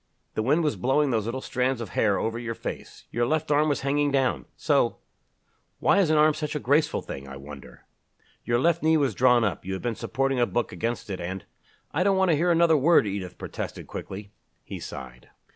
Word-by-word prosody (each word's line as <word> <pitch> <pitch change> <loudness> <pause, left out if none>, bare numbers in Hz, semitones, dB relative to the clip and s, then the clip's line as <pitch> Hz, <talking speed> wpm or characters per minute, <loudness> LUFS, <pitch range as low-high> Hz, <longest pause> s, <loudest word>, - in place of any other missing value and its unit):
The - - -1
wind 150 +9 +2
was 150 - 0
blowing 135 +3 +2
those 110 -3 0
little 130 +3 -3
strands 130 0 -1
of 115 - -5
hair 100 -3 +2
over 115 +1 -2
your 115 -1 -4
face. - - -7
Your 120 0 0
left 155 +1 0
arm 150 +1 +3
was 145 - 0
hanging 145 +1 +1
down 135 -2 +1
so; - - +2 0.8
why 200 - +3
is 185 -5 +3
an 155 - +3
arm 155 +1 +5
such 150 0 -4
a - - 0
graceful 145 +4 +1
thing, 70 0 -7
I 70 0 -8
wonder? 70 -3 -12 0.6
Your 120 0 +1
left 170 +5 +2
knee 160 0 +4
was 140 -6 +1
drawn 125 +2 +4
up 100 -7 -1
you 95 - -4
had 95 - -5
been 120 -1 0
supporting 135 +3 -1
a 120 - +3
book 120 -2 -1
against 115 -2 -3
it 95 - -4
and 95 +1 -5 0.3
" - - -37
"I 160 - -1
don't 195 0 +3
want 190 -2 +3
to - - +4
hear 170 +4 +1
another 170 -2 +4
word," 155 -1 +5
Edith 95 -3 -5
protested - - -6
quickly. 100 +1 -8 0.3
He - - -7
sighed. 60 -2 -9
130 Hz, 220 wpm, -26 LUFS, 105-150 Hz, 0.8 s, arm